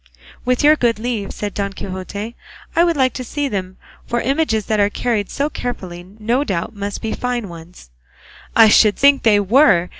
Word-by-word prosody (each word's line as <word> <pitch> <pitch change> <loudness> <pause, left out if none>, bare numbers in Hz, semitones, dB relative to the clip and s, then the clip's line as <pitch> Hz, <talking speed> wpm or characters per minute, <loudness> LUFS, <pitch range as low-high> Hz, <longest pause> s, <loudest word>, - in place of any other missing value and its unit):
"With 250 +3 +1
your 300 +1 +7
good 240 -6 +1
leave," 220 -3 -3
said 205 -1 -5
Don 200 -1 -3
Quixote, 200 +4 -6 0.4
"I 335 - +5
should 340 -3 +1
like 260 -1 +2
to 255 - -5
see 290 +3 -3
them; 190 -5 -4 0.3
for 240 - -1
images 255 -5 0
that 215 -1 0
are 200 0 +3
carried 210 -2 -2
so 285 - -1
carefully 185 - -6
no 235 +5 0
doubt 190 -4 -3
must 200 0 -5
be 220 - -2
fine 245 -3 -3
ones." 165 - -13 0.6
"I 225 -1 +8
should 210 0 +5
think 280 0 +4
they 210 -3 +4
were!" 200 - +4
220 Hz, 185 wpm, -19 LUFS, 200-250 Hz, 0.6 s, I